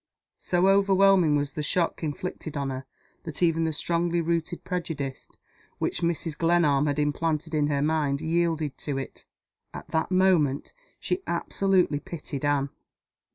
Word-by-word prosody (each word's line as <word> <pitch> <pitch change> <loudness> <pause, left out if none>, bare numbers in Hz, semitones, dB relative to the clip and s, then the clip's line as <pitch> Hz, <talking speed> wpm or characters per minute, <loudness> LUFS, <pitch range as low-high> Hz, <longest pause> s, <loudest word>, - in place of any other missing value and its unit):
So 180 +1 +2
overwhelming 195 -4 +5
was 145 -1 -1
the 150 - -3
shock 165 +3 0
inflicted 155 0 -4
on 140 -1 -2
her 130 +1 -5 0.4
that 160 +1 -4
even 165 -1 +3
the 160 - 0
strongly 170 +2 0
rooted 170 0 -1
prejudice 160 -7 -4 0.5
which - - -2
Mrs. 170 -2 -1
Glenarm 160 -4 +3
had 145 0 0
implanted 155 +2 -1
in 150 -1 +2
her 140 -1 0
mind 150 -3 +1
yielded 160 -3 0
to 145 -3 -3
it. 135 - -7 0.5
At - - -8
that 160 - 0
moment 180 -7 +2 0.3
she 360 +1 -2
absolutely 180 -2 +1
pitied 150 -3 -6
Anne! 140 -1 +1
160 Hz, 145 wpm, -26 LUFS, 145-175 Hz, 0.5 s, overwhelming